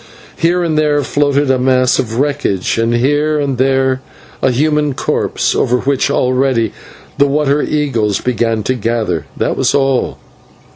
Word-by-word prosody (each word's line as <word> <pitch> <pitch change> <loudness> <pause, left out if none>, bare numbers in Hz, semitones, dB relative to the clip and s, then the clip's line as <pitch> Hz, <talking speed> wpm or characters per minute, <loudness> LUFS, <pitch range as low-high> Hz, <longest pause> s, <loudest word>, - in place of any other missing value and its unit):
Here 175 +2 +1
and 155 -2 0
there 145 -1 +1
floated 145 -1 +1
a 130 - +1
mass 130 0 +2
of 115 -2 -2
wreckage, 135 -8 -1
and 115 +1 +1
here 145 +5 +1
and 140 -4 -2
there 130 0 +1 0.4
a 135 - +3
human 150 +2 +1
corpse, - - -1
over 125 - +1
which 135 +2 0
already 130 -4 +1 0.5
the 140 - +5
water 145 0 +1
eagles 120 -9 0
began 115 -3 -1
to 130 - 0
gather, 115 -6 -1
and 75 - -10
that - - -1
was - - +1
all. 135 -2 0
135 Hz, 155 wpm, -15 LUFS, 120-145 Hz, 0.5 s, the